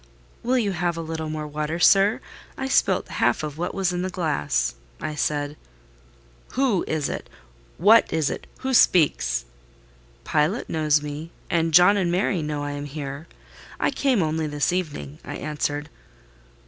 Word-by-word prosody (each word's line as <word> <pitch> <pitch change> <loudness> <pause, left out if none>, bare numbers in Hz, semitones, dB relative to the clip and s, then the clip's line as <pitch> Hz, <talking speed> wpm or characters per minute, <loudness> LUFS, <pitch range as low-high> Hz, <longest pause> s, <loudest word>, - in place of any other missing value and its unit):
"Will 255 +2 +1
you 215 -5 +1
have 175 -2 -1
a - - -2
little 160 -1 -4
more 155 0 -4
water, 150 +2 -3
sir? 195 +4 +5 0.4
I 265 - -2
spilt 265 - +2
half - - +1
of 150 0 -5
what 175 - -2
was 190 -2 0
in 180 - -1
the 185 - -2
glass," 75 - 0 0.3
I 155 - -4
said. 145 -1 -1 1.0
"Who 255 -8 +2
is 155 -2 -1
it? - - -5 0.5
What 215 +6 +5
is 155 -3 +1
it? - - -6
Who 265 0 -1
speaks?" - - +3 0.8
"Pilot 155 +9 0
knows 150 -2 +2
me, 150 +2 -6 0.2
and 165 -1 +2
John 180 +5 +7
and 180 -3 +1
Mary 180 0 +1
know 150 -1 -3
I 145 - -3
am 145 0 -5
here. 145 +1 -6 0.5
I - - +2
came 255 -9 +2
only 155 0 -1
this 145 +2 0
evening," 145 - -4
I - - -6
answered. 145 -1 -3
160 Hz, 160 wpm, -24 LUFS, 150-180 Hz, 1.0 s, John